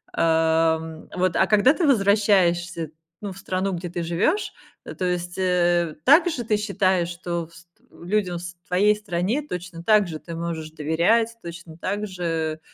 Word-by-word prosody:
Эм, 160 0 +1
вот, 185 -1 +1
а, - - +3
когда 215 +7 +5
ты 340 - 0
возвращаешься, 195 - +2 0.3
ну, 205 - -5
в 185 - -11
страну, 195 0 -2
где 175 0 -5
ты 175 0 -4
живёшь, 185 - 0 0.3
э, - - -7
то 185 - -2
есть, 175 0 -2
э, 175 -3 +1
также 310 -2 +4
ты 215 -2 +1
считаешь, 190 -4 +1
что 175 -1 -4
вс 170 +1 -17 0.2
в - - -16
людям 180 -1 0
в 175 0 -10
твоей 205 +4 +3
стране 210 +5 -2
точно 180 - -7
так 210 +1 +4
же 160 -2 -6
ты 170 +1 -8
можешь 165 -2 -4
доверять? 175 +10 +1
Точно 170 -1 -10
так 205 +4 -3
же, 165 -5 -3
175 Hz, 165 wpm, -23 LUFS, 170-205 Hz, 0.3 s, когда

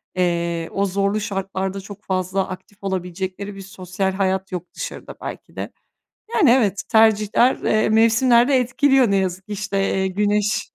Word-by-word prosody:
Eee, 170 -2 -1
o 200 - 0
zorlu 200 +2 0
şartlarda 195 -2 -3
çok 205 0 -11
fazla 185 0 -1
aktif 190 +2 -10
olabilecekleri 190 +1 -4
bir 195 - -9
sosyal 190 0 -3
hayat 190 0 -1
yok 180 -1 -6
dışarıda - - -7
belki - - -8
de. - - -5 0.6
Yani, 290 - +4
evet 210 -5 +2
tercihler, 220 +2 +4
eee, 215 0 +1
mevsimler 230 +2 +4
de 280 - +3
etkiliyor, 260 -1 +3
ne 200 - +3
yazık 185 0 -2
ki 210 - -5
işte, 205 0 -3
eee 190 -1 0
güneş. 205 +1 0
195 Hz, 155 wpm, -21 LUFS, 190-215 Hz, 0.6 s, Yani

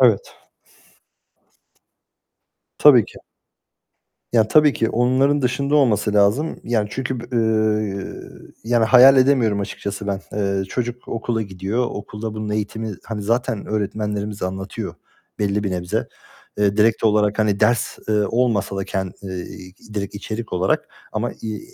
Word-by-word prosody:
Evet. 115 -6 +3 2.4
Tabii 130 -7 +7
ki. - - -14 1.1
Yani 110 -2 +3
tabii 150 +1 +5
ki 115 - 0
onların 130 +4 +2
dışında 140 +3 0
olması 110 -6 +2
lazım. 105 +10 +2
Yani 110 -3 0
çünkü 130 -1 -3
b - - -8
eee, 110 -3 0 0.5
yani 115 0 +3
hayal 130 +4 +8
edemiyorum 130 -6 +3
açıkçası 100 0 -5
ben. 100 -1 -2
Eee, 100 -2 -1
çocuk 120 +4 -4
okula 115 0 -2
gidiyor, 100 +5 -2
okulda 105 +1 -6
bunun 110 0 -4
eğitimi 110 +1 -3
hani 105 -2 -5
zaten 115 0 -1
öğretmenlerimiz 105 -1 -3
anlatıyor 95 +1 -4 0.4
belli 105 0 0
bir 100 - -1
nebze. 90 -1 -2 0.5
Eee, 100 -1 +2
direkt 110 +1 +3
olarak 105 -1 +2
hani 105 -2 +1
ders, 120 -1 +2
eee, 110 - +2
olmasa 115 -5 0
da 95 - -2
ken 95 -2 -3
eee, 95 -2 -5 0.5
direkt 100 -1 -3
içerik 110 +3 -6
olarak 90 +1 0 0.2
ama, - - -2
eee, 110 -2 -4
110 Hz, 135 wpm, -21 LUFS, 100-120 Hz, 2.4 s, hayal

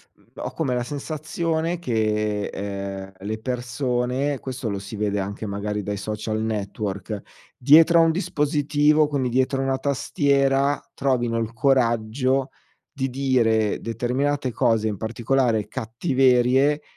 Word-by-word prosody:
mhmm, - - -28
ho - - -5
come 135 -6 -1
la 120 - 0
sensazione 160 +4 -2
che, 105 -6 0
ehm, 100 -1 -5
le 105 +3 -4
persone 125 +3 -1
questo 130 -3 -5
lo 100 - -2
si 100 +3 -8
vede 105 -1 -1
anche 100 +2 -4
magari 105 +1 -3
dai 100 0 -3
social 110 +1 -3
network, 105 -1 -3 0.4
dietro 160 +6 +6
a - - +7
un 165 - +4
dispositivo, 150 -2 +2
quindi 140 -4 -1
dietro 130 +2 +1
a - - 0
una 135 0 0
tastiera 140 0 +1
trovino 120 -4 0
il 115 -1 -2
coraggio 130 +1 +1 0.4
di 135 -2 -2
dire 120 -5 +1
determinate 130 +4 -1
cose, 110 -1 +1
in 105 -3 -2
particolare 115 0 0
cattiverie, 130 +3 +2
125 Hz, 130 wpm, -23 LUFS, 110-140 Hz, 0.4 s, a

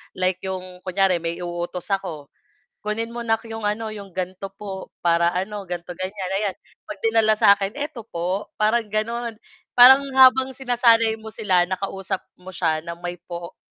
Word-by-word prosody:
like 185 0 +1
'yung 185 -1 -6
kunyari 185 -1 +2
may 170 +1 -4
uutos 175 +2 -5
ako, 170 -7 -3 0.5
"Kunin 225 +2 -2
mo 235 0 -6
'nak 225 -1 +1
'yong 225 -1 -5
ano, 220 +2 -1
'yong 200 -3 -9
ganto 185 +2 -5
po 195 -2 -8
para 170 0 +3
ano 195 +2 -3
ganto 175 0 -6
ganyan." 185 0 -4
Ayan, 205 -2 -1 0.3
'pag - - -7
dinala 225 -1 +4
sa 200 -1 +6
akin, 195 +1 -3
"Eto 285 -6 -5
po?", 185 +3 -3
Parang 220 +2 +3
gano'n, 230 +2 -2 0.4
parang 265 +3 +9
habang 265 0 +6
sinasanay 235 -3 +3
mo 220 0 -10
sila 185 -4 +2
nakausap 195 0 -3 0.2
mo 185 +1 -11
siya 160 -3 0
na 170 - -4
may 175 +1 -6
po 170 -1 -8
195 Hz, 165 wpm, -23 LUFS, 180-225 Hz, 0.5 s, parang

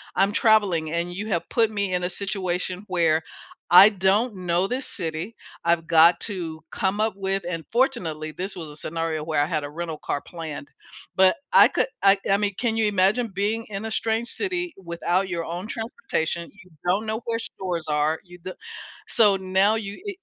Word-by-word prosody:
I'm 195 +1 +3
traveling, 200 -9 +3
and 170 +1 -2
you 205 +4 -5
have 170 -4 -2
put 225 -2 +2
me 200 -3 -2
in 180 0 0
a 180 - 0
situation 185 -1 -2
where 165 -3 +2 0.5
I 190 +3 +11
don't 200 +4 +1
know 180 +1 0
this 255 +3 -3
city, 165 +6 -4 0.3
I've 170 -1 +1
got 170 +1 +6
to 170 -6 -4
come 195 +1 -1
up 220 0 +1
with- 195 -2 -2
and, 165 -2 -4
fortunately, 160 - 0
this 190 +4 -4
was 165 -4 -6
a 150 - -11
scenario 160 0 -3
where 155 -2 0
I 145 - +2
had 155 -2 -2
a 145 - -5
rental 165 +1 -5
car 145 - -3
planned, 155 -4 -7 0.5
but, 190 0 +5 0.2
I - - +9
could- - - 0 0.2
I 195 0 +6
I 195 - +5
mean, 205 -1 0
can 235 -3 0
you 220 -1 +3
imagine 205 +4 +2
being 210 +4 -2
in 200 +1 -5
a 220 - -4
strange 225 +1 0
city 355 -2 -2
without 180 +1 -1
your 170 -2 -3
own 175 +5 -5
transportation, 220 - -3
you 180 - -22
don't 195 +5 +1
know 220 +1 -3
where 230 -1 -1
stores 180 -7 -4
are, 150 +1 +1
you 180 0 -14
do 185 +2 -7 0.6
so 205 -4 +5
now 190 +3 +2
you 205 -3 -4
e 395 - -5
185 Hz, 195 wpm, -24 LUFS, 170-210 Hz, 0.6 s, I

